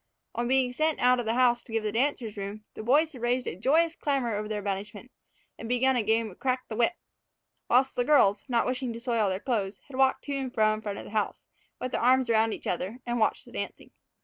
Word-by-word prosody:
On 240 0 -2
being 260 -1 +2
sent 310 +4 0
out 250 0 +4
of 235 - -3
the 225 - +1
house 240 -1 +3
to - - -15
give 225 -1 -1
the 210 - -1
dancers 235 -2 -1
room, 200 +1 -6
the - - -7
boys 295 +8 +3
had 255 -6 -11
raised 245 +1 0
a - - -4
joyous 320 - +2
clamor 265 -6 -1
over 210 +1 -3
their 210 -1 -3
banishment, 205 +4 -5 0.5
and 225 - -7
begun 260 +2 +3
a 245 - +2
game 220 0 +1
of 180 - -17
crack 255 -1 -1
the 220 - -4
whip; 235 +8 +2 0.7
while 250 +2 +5
the 245 - +1
girls, 240 -8 +4
not 235 -2 +2
wishing 255 -1 -2
to 230 - -7
soil 230 -4 +1
their 185 0 -2
clothes, 205 -5 -2
had 260 - -8
walked 265 0 +3
to 285 - -4
and 265 -2 -4
fro 215 -1 +4
in 215 - -5
front 205 -2 -4
of - - -7
the - - -11
house, 215 -1 -2 0.3
with 255 - -4
their - - -1
arms 255 0 +4
around 220 0 +3
each - - -7
other, 185 +6 -2
and 240 0 -1
watched 215 - +1
the - - -15
dancing. - - -6
240 Hz, 250 wpm, -28 LUFS, 215-255 Hz, 0.7 s, while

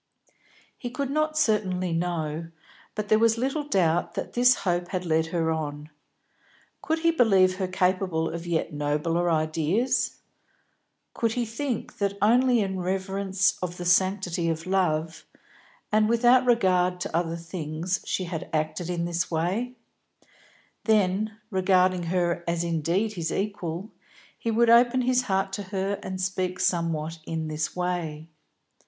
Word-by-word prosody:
He 245 - -4
could 275 +2 -3
not 310 +1 0
certainly 185 - +1
know, 165 -2 -2 0.5
but 210 -1 -3
there 215 +1 +4
was 230 0 +3
little 270 +5 -1
doubt 175 - +1
that - - -4
this 245 +1 +5
hope 175 -1 0
had 185 -1 -3
led 160 -1 +1
her 165 -1 0
on. 150 -1 -4 0.9
Could 320 +1 -1
he 335 0 +4
believe 195 - +4
her 190 -1 -1
capable 185 -3 0
of 170 +1 -5
yet 165 -2 -1
nobler 150 +4 0
ideas; 165 - +1 1.0
could 230 -1 0
he 245 0 -1
think 230 +1 -4
that 200 -1 -1
only 245 +2 +4
in 190 -2 -2
reverence 190 +1 0
of 180 -1 -4
the 175 - -5
sanctity 185 -1 +2
of 160 0 -3
love, 165 -4 0 0.7
and 215 0 +3
without 245 +2 +4
regard 185 -6 +3
to - - -3
other 165 0 0
things, 165 +1 -3
she 185 - -2
had 170 -3 -5
acted 155 +2 -2
in 170 -1 -1
this 170 0 -1
way; 190 +10 -1 1.1
then, 215 0 +2
regarding 185 -1 +3
her 175 0 0
as 170 0 0
indeed 170 +6 0
his 165 -4 -3
equal, 195 -1 -3 0.4
he 230 - -4
would 230 +1 +4
open 240 +2 +5
his 250 0 +3
heart 195 -4 -1
to 205 - -3
her 195 0 -2
and 190 0 -5
speak 185 -1 -2
somewhat 165 -2 -1
in 160 -1 -3
this 155 0 -3
way. 175 -4 -3
185 Hz, 145 wpm, -26 LUFS, 165-215 Hz, 1.1 s, this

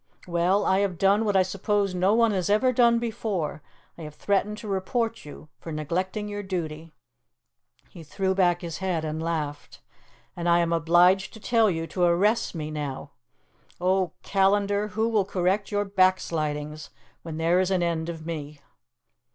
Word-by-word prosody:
Well, 180 +3 +1
I 190 +1 +3
have 195 -3 -1
done 200 +4 +3
what 205 -2 0
I 190 - +5
suppose 195 +1 -1
no 185 +4 +2
one 230 -1 +4
has 185 -3 -1
ever 255 +5 +3
done 235 -1 +4
before: 210 -9 -3 0.4
I - - -8
have 150 -1 -8
threatened 205 +3 0
to 215 - -9
report 225 +3 -2
you 150 +1 -11
for 165 - -8
neglecting 185 +7 -3
your 205 0 -4
duty." 165 -4 -5 1.0
He 170 - -13
threw 190 +4 -1
back 175 -2 +2
his 170 -2 -6
head 180 -4 -1
and 155 +1 -3
laughed. 150 -3 -4 0.6
"And 175 0 -2
I 170 - +5
am 170 -1 +1
obliged 175 +4 +3
to 220 - -11
tell 225 0 +3
you 165 -3 -2
to 180 - -5
arrest 180 +5 +2
me 155 -1 -4
now. 145 -3 -5 0.7
O 185 -1 +1
Callandar, 200 +1 +2
who 220 +1 -1
will 220 -3 +2
correct 190 +2 -1
your 205 0 0
backslidings 155 -6 0 0.3
when 160 -2 -7
there 165 +3 +2
is 185 0 +1
an 185 -2 +1
end 165 -1 -1
of 160 -2 -7
me?" 150 -3 -6
185 Hz, 170 wpm, -26 LUFS, 165-205 Hz, 1.0 s, I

